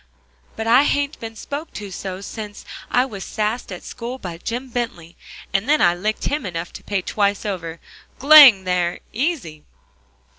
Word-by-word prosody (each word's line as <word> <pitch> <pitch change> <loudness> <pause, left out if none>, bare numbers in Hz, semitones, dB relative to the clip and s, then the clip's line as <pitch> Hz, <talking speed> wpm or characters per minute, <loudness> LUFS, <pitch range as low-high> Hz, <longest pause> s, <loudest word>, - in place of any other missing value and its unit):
but 220 - -4
I 240 +4 +6
hain't 285 +1 0
been 225 -1 -7
spoke 285 +8 -6
to 205 -2 -7
so 190 +1 -6
since 210 0 -8 0.2
I 250 +1 +3
was 205 -7 -7
sassed 215 +1 -3
at 180 - -7
school 245 +2 -6
by 175 -8 -7
Jim 245 +7 -4
Bently, 230 -9 -5 0.4
and 195 +7 0
then 305 - +4
I 175 -1 +4
licked 210 +5 -3
him 290 -1 -1
enough 175 -3 -5
to - - -10
pay 195 -3 -2
twice 200 0 0
over. 170 -5 -4 0.4
G'lang 275 -8 +9
there 180 -1 -1
easy!" 230 - -2
215 Hz, 170 wpm, -21 LUFS, 185-250 Hz, 0.4 s, G'lang